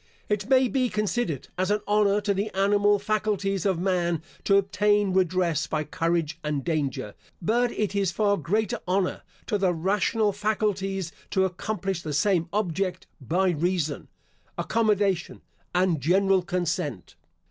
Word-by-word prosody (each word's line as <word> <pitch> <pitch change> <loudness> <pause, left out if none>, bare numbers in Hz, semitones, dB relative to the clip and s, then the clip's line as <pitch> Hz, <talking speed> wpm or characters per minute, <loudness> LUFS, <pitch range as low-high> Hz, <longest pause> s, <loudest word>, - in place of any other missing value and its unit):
It 210 +1 -1
may 260 -1 +5
be 255 -1 0
considered 210 - -2
as 185 +1 +1
an 210 0 +1
honour 210 0 +3
to 205 0 +1
the 200 +2 -1
animal 205 +1 +3
faculties 200 -2 -1
of 190 -3 +1
man 175 -3 0 0.2
to 195 - +5
obtain 205 0 +2
redress 180 -4 +1
by 155 -1 -1
courage 165 +1 -1
and 150 -2 -2
danger, 140 -10 -2 0.3
but 235 +6 +1
it 210 -2 -2
is 200 -3 +1
far 200 +2 +2
greater 215 +7 -1
honour 185 0 0 0.2
to 210 -3 -1
the 185 -3 +2
rational 205 +4 +1
faculties 195 -3 -1 0.2
to 190 0 +2
accomplish 190 0 -3
the 155 -3 -4
same 170 +1 +2
object 185 -2 -1 0.2
by 180 +9 +1
reason, 170 -2 -1 0.5
accommodation, 205 -6 0 0.3
and 180 -4 +2
general 190 +5 +3
consent. 175 - -3
190 Hz, 140 wpm, -26 LUFS, 170-205 Hz, 0.5 s, may